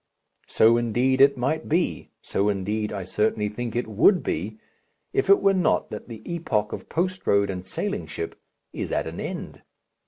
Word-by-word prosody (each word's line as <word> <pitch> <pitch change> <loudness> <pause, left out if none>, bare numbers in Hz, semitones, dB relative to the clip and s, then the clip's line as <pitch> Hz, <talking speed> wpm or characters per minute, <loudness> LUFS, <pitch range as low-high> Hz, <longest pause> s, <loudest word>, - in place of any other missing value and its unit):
So, 115 +1 +5
indeed, 120 +3 +1
it 140 0 +6
might 135 +6 -1
be 170 +3 0
so, 100 +1 0
indeed, 105 +2 -1
I 100 -2 -4
certainly 105 +3 0
think 115 +2 -5
it 120 - 0
would 115 - +4
be 105 +7 -3 0.6
if - - +1
it 200 - +7
were 195 0 +5
not 180 -4 +1
that 105 - -7
the 115 -3 -9
epoch 135 -12 -1
of - - -7
post 185 +3 -2
road 100 0 +3
and 90 -1 -5
sailing 200 - -3
ship 415 0 -6 0.3
is - - -4
at - - 0
an - - -6
end. - - -6
115 Hz, 180 wpm, -25 LUFS, 105-165 Hz, 0.6 s, it